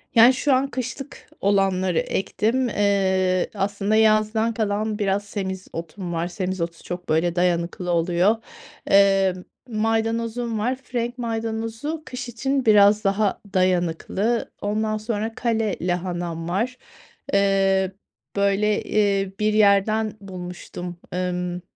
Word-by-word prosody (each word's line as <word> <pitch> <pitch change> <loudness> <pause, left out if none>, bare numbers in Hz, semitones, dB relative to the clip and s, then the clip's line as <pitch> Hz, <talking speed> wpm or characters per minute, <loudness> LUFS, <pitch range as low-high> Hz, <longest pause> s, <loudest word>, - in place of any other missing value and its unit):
Yani, 235 +3 +8
şu 275 +2 +1
an 260 +1 +2
kışlık 260 +2 -6
olanları 190 -3 +2
ektim. 235 +6 0
Eee, 190 -3 +1
aslında 200 +1 0
yazdan 220 +1 +3
kalan 215 -1 -1
biraz 200 0 +1
semizotum 190 -3 -5
var. 170 +1 -1
Semizotu 180 -2 -4
çok, 175 0 -6
böyle, 165 +2 +1
dayanıklı 175 0 0
oluyor. 175 +5 +3 0.5
Emm, 195 -2 +4 0.2
maydanozum 225 +1 -1
var. 245 +5 0
Frenk 245 -2 -4
maydanozu 225 +5 -3
kış 250 -1 -6
için 265 +3 -1
biraz 210 -1 +6
daha 200 0 +1
dayanıklı. 185 +5 0
Ondan 215 +1 -1
sonra 220 0 -3
kale 225 -4 0
lahanam 175 -2 -2
var, 230 +8 -1 0.6
eee, 195 -1 +3 0.4
böyle, 200 +1 +2
eee, 200 -2 +1
bir 215 0 +2
yerden 215 +1 +3
bulmuştum. 180 -2 -7
Emm, 180 -1 -2
200 Hz, 110 wpm, -23 LUFS, 185-225 Hz, 0.6 s, Yani